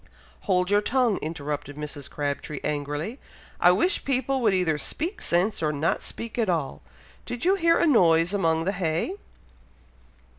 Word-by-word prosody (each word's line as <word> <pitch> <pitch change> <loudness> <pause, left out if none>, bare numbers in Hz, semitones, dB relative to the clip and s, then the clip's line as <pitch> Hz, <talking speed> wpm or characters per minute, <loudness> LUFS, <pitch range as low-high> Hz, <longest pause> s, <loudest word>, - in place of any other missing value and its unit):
"Hold 180 0 +2
your 205 0 +4
tongue," 240 -2 +2
interrupted 145 -2 -5
Mrs. 150 -2 -6
Crabtree, 145 0 -3
angrily. 150 - -3 0.4
"I 180 - +6
wish 220 - +1
people 270 0 0
would 220 -3 +4
either 180 -5 +1
speak 340 - -4
sense, 180 +5 +1
or 155 -1 +1
not 155 +3 0
speak 230 +1 -7
at 220 -4 +1
all! 160 -6 -1 0.5
Did 245 +4 -4
you 375 - +5
hear 335 -3 +3
a - - +3
noise 175 - +4
among 165 -5 +1
the 195 - +1
hay?" 180 - -2
180 Hz, 155 wpm, -25 LUFS, 155-240 Hz, 0.5 s, I